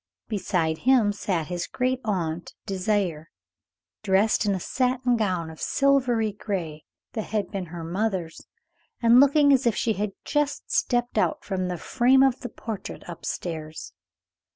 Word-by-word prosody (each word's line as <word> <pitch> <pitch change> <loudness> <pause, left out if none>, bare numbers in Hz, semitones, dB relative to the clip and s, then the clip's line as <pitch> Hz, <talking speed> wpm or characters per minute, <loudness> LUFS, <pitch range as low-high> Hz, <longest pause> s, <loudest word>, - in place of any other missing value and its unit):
Beside 180 -6 -1
him 240 -5 +4
sat 185 -5 -1
his 175 +2 -4
great 255 0 -1
aunt, 175 -6 -2
Désiré, 190 -5 -1 0.8
dressed 205 +2 +2
in 200 - +2
a - - -3
satin 250 +3 +1
gown 185 -7 -1
of 160 - -13
silvery 250 -6 +2
gray 180 -7 -5 0.3
that 220 - -3
had 210 -1 -2
been 195 -4 -4
her 170 0 -7
mother's, 180 -1 -3 0.5
and 235 +1 +6
looking 285 +1 +6
as 260 -2 +3
if 225 - +2
she 225 - +1
had 205 0 -3
just 295 -1 -1
stepped 240 -1 +1
out 300 - 0
from 185 -2 -2
the 180 -1 -3
frame 260 +7 +3
of 265 -2 +2
the 245 - -6
portrait 220 -2 -7
up 175 -2 -9
stairs. 155 - -5
205 Hz, 155 wpm, -25 LUFS, 175-245 Hz, 0.8 s, and